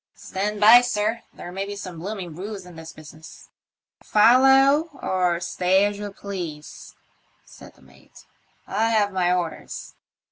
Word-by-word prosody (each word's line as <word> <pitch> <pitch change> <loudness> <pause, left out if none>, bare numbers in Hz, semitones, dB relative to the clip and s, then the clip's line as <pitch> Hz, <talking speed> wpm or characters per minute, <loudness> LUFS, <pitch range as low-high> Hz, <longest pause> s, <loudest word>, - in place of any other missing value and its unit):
*' - - -52
Stand 205 +2 -4
by, 225 +4 +8
sir; 225 -1 -1
there 175 - -10
may 195 +2 -4
be 205 +1 -6
some 185 -4 -8
bloomin' 185 -3 -6
roose 195 +1 -7
in 180 -1 -13
this 160 0 -10
business." 155 0 -14 0.5
"Follow 270 +7 +4
or 180 -2 0
stay 185 +2 +1
as 205 0 -3
you 205 -1 -6
please," 175 -7 -8 0.5
said - - -15
the 65 - -23
mate; 65 0 -20 0.4
"I 220 +3 0
have 210 -3 +1
my 180 -1 +1
orders." 175 -3 -4
195 Hz, 150 wpm, -23 LUFS, 175-215 Hz, 0.5 s, by